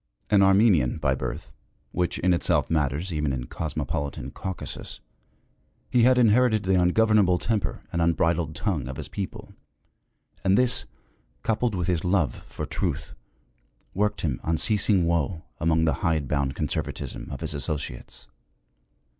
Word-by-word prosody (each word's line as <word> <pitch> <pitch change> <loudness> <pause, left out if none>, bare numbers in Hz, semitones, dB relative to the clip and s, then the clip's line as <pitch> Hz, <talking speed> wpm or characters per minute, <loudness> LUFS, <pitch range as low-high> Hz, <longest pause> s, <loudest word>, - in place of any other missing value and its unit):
An 100 -2 +6
Armenian 95 - +4
by 75 -4 +1
birth, 65 - -5 0.4
which 90 0 -1
in 90 0 +2
itself 85 -4 +1
matters 80 +3 0
even 75 -2 0
in 65 -1 -3
cosmopolitan 70 -3 -4
Caucasus, 95 +3 -6 0.9
he 125 - +4
had 125 +2 +5
inherited 115 -1 +4
the 95 0 +1
ungovernable 100 0 +4
temper 105 +3 -2
and 85 - 0
unbridled 85 -1 +1
tongue 80 - -2
of 65 - -5
his - - -5
people; 100 -2 -6 0.9
and 95 0 +4
this, 125 0 +3 0.6
coupled 115 0 0
with 90 -2 -2
his 85 -3 0
love 90 -5 0
for - - -5
truth, - - -3 0.8
worked 105 +2 0
him 70 -7 -2
unceasing 95 +3 +2
woe 85 0 0 0.2
among 80 0 +2
the 80 - +2
hidebound 70 -6 0
conservatism 75 0 -4
of - - -7
his - - -2
associates. 70 -3 -5
85 Hz, 135 wpm, -26 LUFS, 75-100 Hz, 0.9 s, An